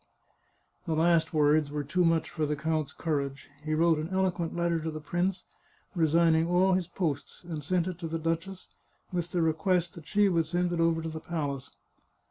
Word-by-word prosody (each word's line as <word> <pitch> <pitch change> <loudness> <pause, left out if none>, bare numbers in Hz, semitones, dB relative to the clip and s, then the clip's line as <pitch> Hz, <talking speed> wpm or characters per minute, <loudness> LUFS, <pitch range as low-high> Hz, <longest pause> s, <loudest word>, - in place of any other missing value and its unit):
The 160 - 0
last 165 0 +3
words 150 -1 +3
were 145 0 -3
too 180 +6 +1
much 165 -1 +2
for 155 -2 -1
the 150 - 0
count's 155 -1 -1
courage; 140 -3 -3
he 155 0 -1
wrote 165 0 +3
an 155 +2 -4
eloquent 185 -3 0
letter 170 -1 +1
to 160 +1 -3
the 155 -1 -5
prince, 175 +5 -1 0.5
resigning 165 -1 +3
all 185 +2 +3
his 180 -2 0
posts, 145 -6 -3
and 160 -4 -6
sent 175 +3 +1
it 180 -2 -5
to 170 - -4
the 165 +1 -2
duchess, 165 +4 -3 0.4
with 175 -1 -1
the 175 -1 0
request 175 +2 +1
that 170 -6 -12
she 205 -1 +3
would 165 -4 +1
send 175 +2 0
it 170 - -2
over 165 -1 +2
to 165 - -3
the 160 0 -6
palace. 145 -6 -4
165 Hz, 195 wpm, -29 LUFS, 155-175 Hz, 0.5 s, last